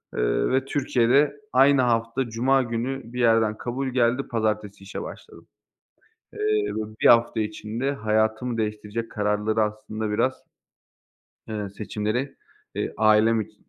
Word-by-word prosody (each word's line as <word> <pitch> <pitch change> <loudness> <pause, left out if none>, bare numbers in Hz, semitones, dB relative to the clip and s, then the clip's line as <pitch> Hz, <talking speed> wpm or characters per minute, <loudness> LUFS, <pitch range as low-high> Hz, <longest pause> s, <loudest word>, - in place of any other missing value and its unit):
ııı - - +1
ve 130 0 +1
Türkiye'de 135 +1 +2
aynı 135 +1 +5
hafta 120 +1 0
cuma 130 +4 +2
günü 120 +1 -4
bir 125 - -4
yerden 115 -2 +3
kabul 130 +4 -3
geldi, 125 0 +1
pazartesi 105 -3 -2
işe 100 - -6
başladım. - - -11 0.9
Eee, 435 - -10 0.4
ve - - -2 0.2
bir - - +5
hafta 115 -1 +5
içinde 110 +4 -3
hayatımı 110 0 0
değiştirecek 105 +1 -3
kararları 105 +1 0
aslında 110 0 -4
biraz 130 +5 0 1.1
eee, 105 -2 -4
seçimleri, 110 +6 -3 0.4
eee, - - -3
ailem 110 +1 +4
içi 105 0 -11
115 Hz, 125 wpm, -24 LUFS, 110-125 Hz, 1.1 s, aynı